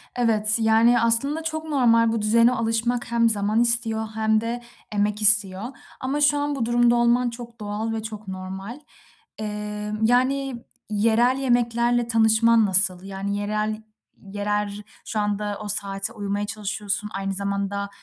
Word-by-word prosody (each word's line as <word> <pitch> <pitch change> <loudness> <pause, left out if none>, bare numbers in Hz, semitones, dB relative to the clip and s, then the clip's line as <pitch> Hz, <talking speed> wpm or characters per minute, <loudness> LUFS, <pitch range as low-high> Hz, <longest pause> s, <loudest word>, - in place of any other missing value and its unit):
Evet, 220 -3 +2
yani, 225 +2 +4
aslında 275 +8 +1
çok 315 -1 -3
normal, 230 -6 +3
bu 225 - -1
düzene 230 +3 +4
alışmak 230 0 -1
hem 230 -1 +3
zaman 210 +1 +1
istiyor 230 -2 +1
hem 220 0 +1
de 235 +1 -4 0.3
emek 210 0 -1
istiyor. 205 -2 +4 0.4
Ama 275 +3 -2
şu 290 0 +4
an 290 0 -1
bu 235 - -1
durumda 240 0 +3
olman 240 +1 +2
çok 235 0 -10
doğal 215 +2 -3
ve 220 - -4
çok 215 -1 -8
normal. 190 +6 -7 0.6
Eee, 210 0 -5
yani, 255 +1 +1 0.2
yerel 230 +4 +2
yemeklerle 240 -2 +1
tanışman 225 0 +4
nasıl? 190 -2 +2
Yani, 195 +1 -4
yerel 215 +1 -2 0.4
yerer 205 +1 -3 0.2
şu 220 - -3
anda 205 0 -2
o 210 - -6
saate 200 +1 -2
uyumaya 205 -1 -3
çalışıyorsun, 210 0 -4
aynı 195 0 -3
zamanda, 200 0 -3
220 Hz, 145 wpm, -23 LUFS, 205-235 Hz, 0.6 s, yani